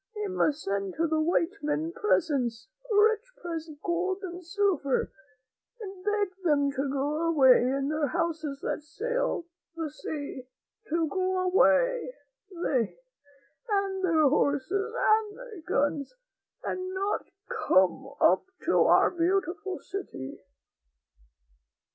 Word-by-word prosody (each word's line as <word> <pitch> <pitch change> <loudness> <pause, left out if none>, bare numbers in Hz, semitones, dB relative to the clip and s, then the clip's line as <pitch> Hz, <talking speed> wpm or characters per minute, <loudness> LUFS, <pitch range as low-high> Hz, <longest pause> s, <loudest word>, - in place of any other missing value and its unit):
We 420 0 -3
must 310 -5 0
send 195 -1 -2
to 335 - +1
the 315 -1 +1
white 345 +4 0
men 305 +2 -1
presents 295 - 0
— - - -13
rich 440 +3 +3
presents 330 -2 -5
of - - -41
gold 370 +3 -1
and 360 -1 -6
silver, 350 -7 0 0.7
and 385 -4 -8
beg 415 -1 +1
them 285 -4 +3
to 275 0 -2
go 295 +4 0
away 265 -6 +6
in 270 +3 0
their 305 -1 0
houses 315 -2 -2
that - - -2
sail 470 +5 -2 0.3
the 325 -3 -4
sea 285 -4 -6 0.2
— 445 - -31
to 325 +1 +1
go 370 +3 0
away, - - +3 0.3
they, 285 - -1 0.7
and 395 -2 0
their 320 -4 +4
horses, 300 +9 +1
and 430 -1 +2
their 485 -8 -10
guns, 290 - 0 0.5
and 370 0 -3
not 395 +2 -1 0.4
come 190 +9 +4
up - - +4 0.2
to - - +3
our - - +5
beautiful 370 +2 -1
city." 260 - -7
340 Hz, 130 wpm, -28 LUFS, 290-395 Hz, 0.7 s, away